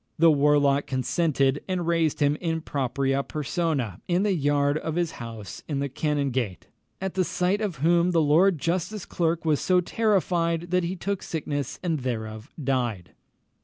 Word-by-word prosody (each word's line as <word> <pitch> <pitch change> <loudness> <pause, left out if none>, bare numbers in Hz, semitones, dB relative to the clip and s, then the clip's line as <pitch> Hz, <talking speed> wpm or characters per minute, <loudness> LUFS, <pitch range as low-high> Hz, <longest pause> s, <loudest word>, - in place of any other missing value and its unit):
The 165 0 +6
warlock 145 -1 +3
consented, 135 +1 +1
and 185 -2 -1
raised 165 -3 +1
him 145 0 +3
in 165 -1 -2
propriâ 135 0 0
personâ 145 - -2
in 180 +2 +2
the 210 -2 +2
yard 145 -2 +1
of 160 0 -4
his 175 -2 0
house 110 -5 -8
in 145 - -2
the 140 0 -1
Canongate, 135 - -1 0.3
"at 190 -1 -4
sight 180 +4 0
of 205 -6 -2
whom 170 +4 +3
the 170 -2 +2
Lord 165 +5 +4
Justice 175 +6 -2
Clerk 165 -1 -1
was 155 -3 +2
so 185 -1 +3
terrified, 175 -4 0
that 180 -1 +2
he 175 +2 -2
took 195 +2 -3
sickness 145 -4 -3
and 165 -4 0
thereof 110 -4 -4
died." 125 - -1
155 Hz, 160 wpm, -26 LUFS, 140-175 Hz, 0.3 s, The